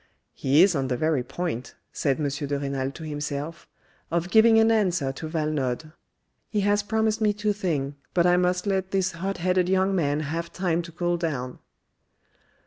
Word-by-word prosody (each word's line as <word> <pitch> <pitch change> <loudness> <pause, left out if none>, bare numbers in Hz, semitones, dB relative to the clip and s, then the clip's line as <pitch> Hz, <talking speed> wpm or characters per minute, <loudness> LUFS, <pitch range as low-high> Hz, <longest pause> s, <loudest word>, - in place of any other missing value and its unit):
" - - -51
He 140 +6 +4
is 190 -3 +3
on 135 -2 0
the 125 -1 -1
very 155 -1 +1
point," 145 -3 -4 0.2
said 140 -1 0
M. 150 - 0
de 145 0 -2
Renal 135 -1 -2
to 160 - -9
himself, 150 +1 -5 0.4
"of 170 +1 -1
giving 225 +1 +6
an 225 0 +5
answer 180 -11 +1
to 155 +4 -7
Valenod. 155 -2 -2 0.6
He 210 - 0
has 205 +1 +2
promised 220 +1 0
me 210 -1 +3
tothing, 190 -10 -1 0.2
but 175 -1 +4
I 175 0 +5
must 180 +1 +1
let 190 -2 0
this 190 -1 0
hot 190 +3 -4
headed 180 +1 +1
young 190 +1 +2
man 150 -4 +1
have 165 +3 -4
time 175 -3 0
ocool 175 +1 -2
down." 130 -7 -3
170 Hz, 175 wpm, -25 LUFS, 145-190 Hz, 0.6 s, giving